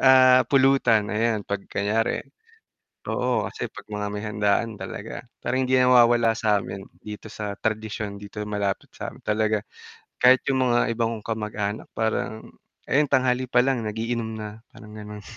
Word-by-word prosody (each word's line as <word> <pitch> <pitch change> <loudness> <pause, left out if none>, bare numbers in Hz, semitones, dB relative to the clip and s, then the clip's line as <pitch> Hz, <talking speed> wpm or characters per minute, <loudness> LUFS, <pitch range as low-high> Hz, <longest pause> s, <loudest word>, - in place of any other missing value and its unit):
ah, 130 -1 +7
pulutan 135 -5 +4
ayan, 110 -1 0
'pag 100 0 -3
kunyari 105 +3 0 0.8
oo, - - 0
kasi - - -5
'pag - - -11
mga 105 0 -2
may 105 +1 -5
handaan 105 +1 0
talaga - - -6 0.2
parang 130 +1 -1
hindi 130 0 +2
nawawala 120 -2 +5
sa'min 105 -3 0 0.2
dito 105 +1 -9
sa 105 -1 -4
tradisyon 110 -2 -3
dito 105 +1 -8
malapit 100 -2 -2
sa'min - - -8
talaga, 110 0 +1 0.6
kahit 130 +1 +6
yung 130 -1 +2
mga 120 -1 +2
ibang 115 0 0
kong 105 - -11
kamag-anak 105 -1 -3
parang 110 0 -1 0.4
ayan, 145 +1 +2
tanghali 130 -1 +2
pa 125 0 +4
lang 135 -2 +1
nag-iinom 110 +1 -2
na, 110 0 -7
parang 105 0 -14
ganun. 105 -1 -9
110 Hz, 150 wpm, -25 LUFS, 105-125 Hz, 0.8 s, ah